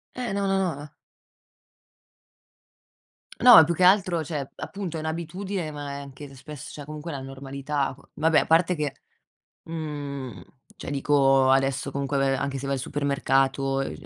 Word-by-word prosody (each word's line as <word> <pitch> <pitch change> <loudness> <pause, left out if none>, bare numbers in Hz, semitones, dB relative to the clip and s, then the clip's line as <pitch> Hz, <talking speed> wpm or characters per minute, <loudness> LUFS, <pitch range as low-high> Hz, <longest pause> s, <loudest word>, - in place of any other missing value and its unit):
Eh 245 -5 -3
no, 200 -1 0
no, 195 0 +2
no 180 -5 0
la 145 +1 -11 2.5
No, 245 -2 +10
è - - +10
più 170 +2 0
che 180 - 0
altro 185 -3 +4
cioè 145 -3 -5
appunto, 185 -5 -5
è - - -4
n 155 - -6
abitudine, 170 +1 -4
ma 145 -1 -6
è - - -5
anche 140 0 -11
spess 145 +1 -9
cioè 145 - -8
comunque 155 +3 -7
la 135 -2 -5
normalità 135 +1 -4
c - - -17
vabbè, 160 0 +3
a - - -1
parte 165 +2 +3
che 150 -3 -3 0.7
mhmm, 145 - -6 0.4
cioè - - -7
dico, 135 -2 +3
adesso 135 0 +2
comunque 140 0 -2
ve 135 0 +2
anche 135 0 -3
se 135 - -5
vai 140 - 0
al 130 - -4
supermercato, 135 -1 0
e - - -6
145 Hz, 170 wpm, -25 LUFS, 135-165 Hz, 2.5 s, No